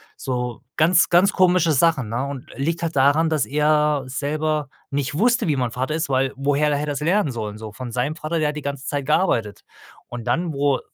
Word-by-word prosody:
so 125 -2 -4 0.2
ganz, 170 +3 +4
ganz 180 +3 +4
komische 180 -4 +3
Sachen, 135 -5 +2
ne, 120 +4 -2
und 140 -2 -6
liegt 165 +5 -2
halt 165 -3 -2
daran, 145 +4 +4
dass 155 -4 +1
er 150 -1 +2
selber 150 +2 -2 0.2
nicht 140 0 -2
wusste, 240 +3 +2
wie 145 - +1
man 125 -3 -1
Vater 130 +5 -2
ist, 160 -1 -1
weil 135 0 +1
woher 145 +2 +1
hätte 145 -1 +1
er 150 - -2
das 145 0 -3
lernen 170 -2 +1
sollen, 105 -2 -5
so 110 -1 -9
von 125 +1 -7
seinem 125 +6 -1
Vater 165 +1 -3
der 150 -1 +1
hat 150 - -5
die 150 - -5
ganze 140 -1 -5
Zeit 145 -2 -2
gearbeitet. 135 - 0 0.4
Und 120 -2 -7
dann, 170 -2 0
wo 140 -1 +1
145 Hz, 215 wpm, -22 LUFS, 130-155 Hz, 0.4 s, ganz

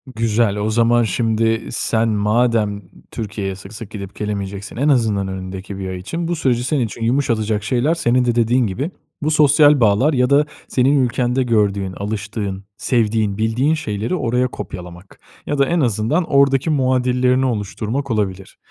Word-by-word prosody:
Güzel. 110 -2 +1
O 105 +1 -1
zaman 120 +2 +3
şimdi 115 +2 0
sen 115 0 0
madem 105 0 +1 0.3
Türkiye'ye 105 -3 -4
sık 95 +2 -12
sık 110 -1 -9
gidip 100 -2 -8
gelemeyeceksin 100 -1 -5
en 140 +5 +2
azından 110 -7 +2
önündeki 95 +1 -6
1 95 -1 -4
ay 95 - -4
için 165 - -4
bu 175 - -1
süreci 125 -6 0
senin 130 -1 0
için 115 +1 -8
yumuşatacak 115 -4 0
şeyler 125 +8 +1
senin 125 -6 +1
de 120 -1 +1
dediğin 120 +1 +2
gibi 135 - -3 0.3
bu 155 +1 0
sosyal 150 -1 +5
bağlar 115 +7 +3
ya 125 -1 +2
da 145 +1 +4 0.2
senin 135 +2 +2
ülkende 125 +1 0
gördüğün, 100 -5 0
alıştığın, 100 -1 -4
sevdiğin, 110 -4 0
bildiğin 115 +7 +1
şeyleri 110 - -2
oraya 125 -4 0
kopyalamak. 90 -4 -9 0.3
Ya 145 - -2
da 140 - +4
en 175 +4 0
azından 120 - +1
oradaki 140 -1 +2
muadillerini 130 -2 +2
oluşturmak 115 +3 -3
olabilir. 95 -3 -3
115 Hz, 155 wpm, -19 LUFS, 105-130 Hz, 0.3 s, sosyal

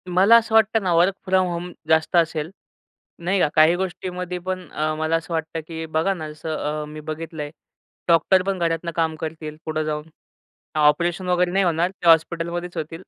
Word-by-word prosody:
मला 195 +5 +7
असं 225 -1 0
वाटतं 220 -1 +4
ना 180 -2 +1
वर्क 175 +4 +4
फ्रॉम 185 -1 +2
होम 175 0 -4 0.2
जास्त 160 +2 +2
असेल, 165 -1 +1 0.7
नाही 185 +3 0
का. 175 - +4
काही 155 +2 +6
गोष्टीमध्ये 180 -1 -4
पण 185 0 -5
अ, 155 0 -1
मला 160 +1 0
असं 165 +1 -3
वाटतं 160 0 -2
की 160 -1 -5
बघा 160 +4 0
ना 155 -4 -6
जसं 155 +1 -5 0.3
अ, - - -6
मी 150 +1 -9
बघितलंय 155 -1 -6 0.6
डॉक्टर 170 +3 +4
पण 195 -1 -2
घरातुन 170 0 -1
काम 160 -1 0
करतील 155 -1 -6
पुढं 155 0 -1
जाऊन. 155 0 -4 0.7
ऑपरेशन 170 +5 +2
वगैरे 180 0 +2
नाही 195 +1 +2
होणार. 175 +1 +1
ते 175 -3 -2
हॉस्पिटलमध्येच 170 +2 +2
होतील. 165 +2 -5
170 Hz, 180 wpm, -22 LUFS, 160-180 Hz, 0.7 s, मला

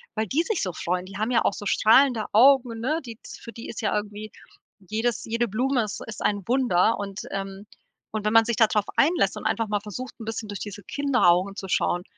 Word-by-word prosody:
weil 220 0 0
die 290 - +1
sich 430 0 -2
so 185 - -2
freuen. 180 +3 -2
Die 195 +1 -9
haben 215 +4 -1
ja 240 - +3
auch - - +1
so 205 - -8
strahlende 230 +1 +4
Augen, 245 0 +5
ne, 295 +8 0
die 230 -2 -9
für 230 - -10
die 230 - -9
ist - - -6
ja 215 - 0
irgendwie 210 0 -5 0.6
jedes 225 +2 -1
jede 230 +1 -1
Blume 245 +4 0
ist 210 -1 -6
ist 220 - -8
ein 205 -3 -1
Wunder 235 -5 +2
und, 200 -1 -5
ähm, 195 0 -5 0.5
und 215 -1 -4
wenn 215 - +1
man 225 0 +6
sich 235 -1 -2
da 225 - +6
drauf 210 -1 0
einlässt 330 +5 +2
und - - -8
einfach 225 -1 0
mal 205 0 0
versucht, 230 +5 -7
'n 225 - -8
bisschen 225 0 -5
durch 205 -2 -5
diese 205 -1 -7
Kinderaugen 200 -9 +2
zu 195 - -6
schauen, 175 -1 0
220 Hz, 225 wpm, -25 LUFS, 200-240 Hz, 0.6 s, man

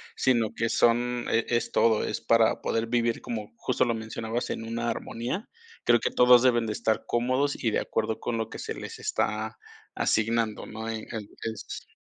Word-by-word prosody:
Sino 120 -5 +2
que 115 0 0
son 120 +1 +2
e 115 - +2
es 120 -1 0
todo, 110 -2 +4
es 105 - -3
para 115 -1 +3
poder 115 0 0
vivir, 115 -1 +1
como 110 -3 -5
justo - - +1
lo 115 - +1
mencionabas, 110 +1 -3
en - - -4
una 115 +1 -2
armonía. 120 - -4 0.3
Creo 120 0 +5
que - - -1
todos 125 0 +7
deben 120 -2 +4
de 110 - -2
estar 110 0 0
cómodos 130 +4 0
y 115 - +1
de - - +2
acuerdo 110 0 -2
con 120 - -2
lo 110 -1 -2
que - - -8
se - - -4
les - - -8
está 110 +1 -1 0.4
asignando, 110 0 +1
¿no?, 110 +1 -7
eh, 110 -1 -4
en 110 -3 -5 0.2
es 110 0 -6
115 Hz, 190 wpm, -27 LUFS, 110-120 Hz, 0.4 s, todos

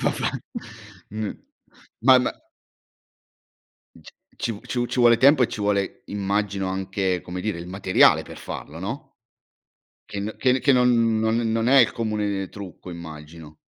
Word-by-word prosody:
Va - - +2
beh, - - -1 0.7
n 110 +1 -4 0.8
ma 130 0 +7
ma 125 - 0 1.7
c - - -14 0.2
ci 115 - -2
v 105 - -9
ci 120 -1 -1
ci - - -4
vuole 120 -1 +6
tempo 140 +1 +6
e - - +4
ci 105 - -6
vuole, 100 -1 -1
immagino, 100 -1 -1
anche, 95 -1 -1
come 90 +1 -6
dire, 100 -3 -3
il 85 - -7
materiale 95 0 +4
per - - -11
farlo, 80 +3 -8
no 110 +10 -5 1.1
che 100 - -5
n 105 +2 -4
che 130 0 +2
che 140 - +3
non 120 -3 +3
non 110 0 +1 0.2
non 115 +1 +1
è 135 0 +7
il 115 - +4
comune 105 -4 -2
trucco, 95 -2 -10
immagino? 80 -2 -10
105 Hz, 155 wpm, -24 LUFS, 95-115 Hz, 1.7 s, ma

